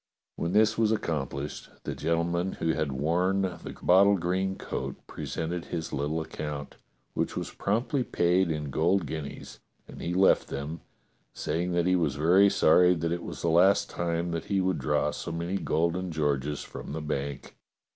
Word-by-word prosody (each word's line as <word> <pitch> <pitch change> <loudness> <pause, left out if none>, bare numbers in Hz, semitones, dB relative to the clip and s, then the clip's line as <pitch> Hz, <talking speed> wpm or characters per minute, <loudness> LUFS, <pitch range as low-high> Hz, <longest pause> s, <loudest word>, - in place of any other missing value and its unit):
When 85 +2 -2
this 110 +1 +4
was 110 -1 +3
accomplished 75 -8 -3
the - - -3
gentleman 85 +3 0
who 80 - -2
had 75 -3 -1
worn 90 +8 +1
the 95 -2 -5
bottle 100 +2 +6
green 95 +2 -1
coat - - -4
presented 85 +1 -4
his 80 -2 -4
little 75 +3 -1
account, 75 -2 -6 0.4
which - - -2
was - - -3
promptly 125 +6 0
paid 90 -3 +2
in 75 -3 -3
golden 85 +6 +2
guineas, 75 -3 -7 0.3
and - - -10
he 85 +1 -2
left 95 +1 +4
them, 75 +4 -5 0.5
saying 90 +2 -1
that 85 -1 +2
he 90 0 +3
was 80 -6 +1
very 90 +7 +5
sorry 90 +1 +5
that 85 0 -2
it 85 0 -1
was - - -7
the 85 - +2
last 90 +4 +4
time 85 0 -1
that 85 -1 -3
he 100 -1 0
would 95 -4 +1
draw 65 - +1
so - - -5
many 85 +3 -2
golden 85 +2 0
Georges 75 -2 -1
from - - -8
the 80 - -3
bank. 70 -2 -4
85 Hz, 170 wpm, -28 LUFS, 75-95 Hz, 0.5 s, bottle